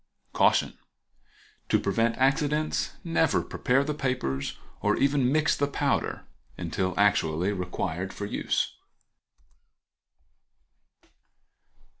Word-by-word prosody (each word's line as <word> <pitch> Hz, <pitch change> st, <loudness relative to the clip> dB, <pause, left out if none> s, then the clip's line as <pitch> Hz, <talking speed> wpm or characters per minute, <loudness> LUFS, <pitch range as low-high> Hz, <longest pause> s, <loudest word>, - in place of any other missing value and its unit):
Caution.—To -, -, -2 dB
prevent 115 Hz, 0 st, +1 dB
accidents 140 Hz, +1 st, +1 dB
never 165 Hz, -1 st, +2 dB
prepare 135 Hz, +1 st, +1 dB
the 150 Hz, +1 st, -2 dB
papers, 125 Hz, -, -2 dB, 0.2 s
or -, -, +2 dB
even 140 Hz, -2 st, +2 dB
mix 155 Hz, +1 st, +3 dB
the 145 Hz, -, 0 dB
powder, 140 Hz, -, -1 dB, 0.3 s
until 95 Hz, -1 st, -2 dB
actually 95 Hz, -2 st, +2 dB
required 90 Hz, 0 st, -3 dB
for 100 Hz, -, -5 dB
use. 100 Hz, -, -1 dB
130 Hz, 85 wpm, -27 LUFS, 95-145 Hz, 0.3 s, mix